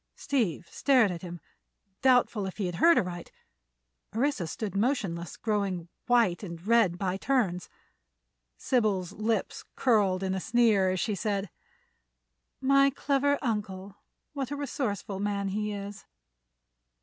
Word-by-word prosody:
Steve 220 - -1
stared 255 -7 +3
at 170 -2 -6
him, 175 -1 -7 0.6
doubtful 245 -6 +3
if 190 - -8
he 190 -4 -1
heard 330 - +5
aright. 175 -2 -2 0.8
Orissa 245 - 0
stood 200 +4 -4
motionless, 195 - -1
growing 195 -6 -2 0.2
white 230 -8 +3
and 170 -3 -8
red 220 -6 +3
by 185 0 -1
turns. 200 -8 0 0.9
Sybil's 210 -8 0
lips 220 +1 -2
curled 200 -7 +2
in 190 0 -1
a 190 - -1
sneer 220 -3 +3
as 185 0 -1
she 215 - -1
said: 200 -1 -2 1.1
"My 275 +1 +4
clever 285 +1 +1
uncle! 200 -4 -3 0.4
What 275 -3 -3
a 290 - -3
resourceful 225 - -3
man 200 -1 -1
he 210 +2 -2
is." 200 0 -7
205 Hz, 125 wpm, -28 LUFS, 185-245 Hz, 1.1 s, heard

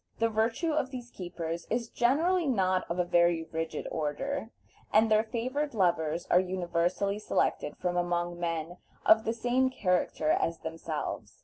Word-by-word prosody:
The 230 0 +2
virtue 225 +9 0
of 300 -4 0
these 245 -2 -8
keepers 170 -2 -5
is 235 0 -2
certainly 320 +8 +2
not 185 -7 +1
of 170 - -2
a 180 - +3
very 170 -1 +3
rigid 165 0 -3
order, 220 - -2 0.4
and 220 +1 +4
their 215 0 +5
favored 255 +5 -2
lovers 170 -3 +1
are 180 - +7
universally 185 +2 0
selected 150 -7 0
from 180 -1 -1
among 175 0 -1
men 165 0 -3 0.3
of 220 0 +6
the 225 - +1
same 245 +3 +1
character 180 -8 0
as 165 0 0
themselves. 160 -1 -5
185 Hz, 150 wpm, -30 LUFS, 170-235 Hz, 0.4 s, are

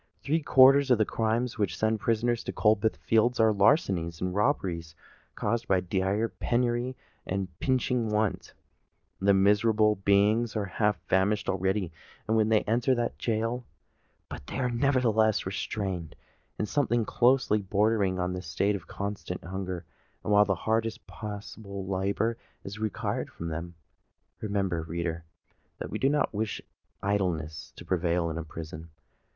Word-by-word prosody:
Three 160 +4 +1
quarters 135 0 +6
of 125 - +5
the 110 - +3
crimes 115 +3 -1
which 95 -5 0
send 110 0 +1
prisoners 115 +2 0
to - - -2
Coldbath 110 0 +2
Fields, 115 +2 +2
are 110 -1 +5
larcenies 95 - +2
and 90 0 -2
robberies 90 - -1 0.4
caused 115 +2 -1
by 95 -1 +3
dire 95 +4 0
penury 120 +2 -1 0.3
and 95 0 -2
pinching 125 -3 0
want: 105 -1 -1 0.6
the 100 +1 +4
miserable 105 +2 +3
beings 100 +4 +2
are 105 -2 0
half 105 0 0
famished 95 +4 +1
already 95 -1 0 0.3
when 110 0 +2
they 110 -1 +4
enter 120 +4 +1
that 120 -1 -2
gaol; 115 +2 -1 0.6
but - - -9
they - - -5
are 125 -2 0
nevertheless 115 -4 +2
retained 95 -3 -3 0.4
in 105 - -1
something 120 -2 +1
closely 120 -3 +3
bordering 100 -1 +1
on 90 0 -1
that 90 - -4
state 95 +5 0
of 95 - -8
constant 100 -2 -5
hunger, 95 -1 -5 0.4
while 105 0 +4
the 95 -1 +1
hardest 110 +4 -1
possible 100 -2 -7
labour 100 +5 -1 0.2
is 100 +2 -7
required 110 -3 -2
from 85 - -6
them! 85 +2 -5 0.7
Remember, 95 -5 -1
reader, 85 0 -4 0.5
that - - -6
we - - -3
do 135 - +3
not 145 -4 +1
wish 105 +1 -2 0.4
idleness 80 -6 -1
to - - -11
prevail 85 -1 0
in 80 - -4
a - - -4
prison. 80 +1 -8
105 Hz, 145 wpm, -28 LUFS, 95-115 Hz, 0.7 s, quarters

